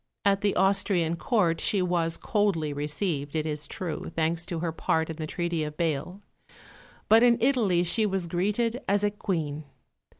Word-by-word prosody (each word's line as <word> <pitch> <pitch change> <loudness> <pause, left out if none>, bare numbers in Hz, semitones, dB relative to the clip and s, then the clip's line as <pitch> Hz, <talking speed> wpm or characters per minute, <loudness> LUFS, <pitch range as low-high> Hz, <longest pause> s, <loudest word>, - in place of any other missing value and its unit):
At 200 -1 +3
the 205 -1 +1
Austrian 190 -4 +2
Court 170 -4 +1
she 205 - +2
was 175 -2 0
coldly 195 -9 0
received, 150 0 -3
it 155 -1 0
is 150 -2 -3
true, 170 -1 -5
thanks 165 +1 0
to 170 - -3
her 165 0 -2
part 160 0 0
in 160 - -8
the 155 -1 -4
Treaty 170 -1 -2
of 150 0 -6
Bâle; 170 +3 -2 0.9
but 225 +1 +6
in 240 -1 +5
Italy 225 -9 +2
she 215 +5 +1
was 190 -3 -1
greeted 210 +8 -1
as 200 +1 +2
a 205 - +2
Queen. 160 -8 -3
175 Hz, 170 wpm, -27 LUFS, 160-205 Hz, 0.9 s, but